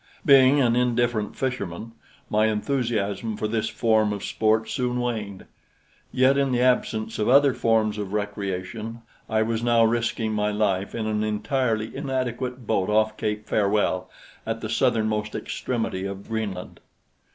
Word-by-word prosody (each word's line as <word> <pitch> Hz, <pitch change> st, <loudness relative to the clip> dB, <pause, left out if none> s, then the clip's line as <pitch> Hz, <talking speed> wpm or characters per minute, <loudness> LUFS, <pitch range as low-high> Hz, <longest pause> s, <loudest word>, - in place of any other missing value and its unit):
Being 135 Hz, 0 st, +6 dB
an 120 Hz, -3 st, +3 dB
indifferent 120 Hz, -3 st, 0 dB
fisherman, 115 Hz, -5 st, -4 dB, 0.4 s
my 110 Hz, +1 st, +2 dB
enthusiasm 110 Hz, -2 st, -1 dB
for 105 Hz, -, -1 dB
this 110 Hz, 0 st, -1 dB
form 110 Hz, -2 st, +2 dB
of 100 Hz, -1 st, -4 dB
sport 110 Hz, 0 st, +1 dB
soon 125 Hz, -2 st, -1 dB
waned; 110 Hz, -6 st, -3 dB, 0.7 s
yet 130 Hz, +2 st, +3 dB
in 135 Hz, -1 st, +1 dB
the 125 Hz, -, +1 dB
absence 115 Hz, -3 st, +1 dB
of 105 Hz, -, +1 dB
other 140 Hz, +1 st, +6 dB
forms 110 Hz, -2 st, +1 dB
of 100 Hz, -2 st, -4 dB
recreation 105 Hz, +2 st, -4 dB, 0.3 s
I 110 Hz, 0 st, +2 dB
was 115 Hz, 0 st, -1 dB
now 120 Hz, -1 st, +4 dB
risking 115 Hz, -1 st, 0 dB
my 105 Hz, 0 st, 0 dB
life 100 Hz, -2 st, -1 dB
in 115 Hz, -2 st, -2 dB
an 110 Hz, 0 st, 0 dB
entirely 110 Hz, +1 st, -1 dB
inadequate 130 Hz, -2 st, -3 dB
boat 95 Hz, -2 st, 0 dB
off 110 Hz, 0 st, +2 dB
Cape 105 Hz, 0 st, -3 dB
Farewell 100 Hz, -3 st, +1 dB, 0.3 s
at -, -, -4 dB
the -, -, -4 dB
southernmost 105 Hz, -1 st, 0 dB
extremity 115 Hz, -6 st, -3 dB
of 100 Hz, 0 st, -8 dB
Greenland. 105 Hz, -5 st, -4 dB
110 Hz, 145 wpm, -24 LUFS, 105-120 Hz, 0.7 s, Being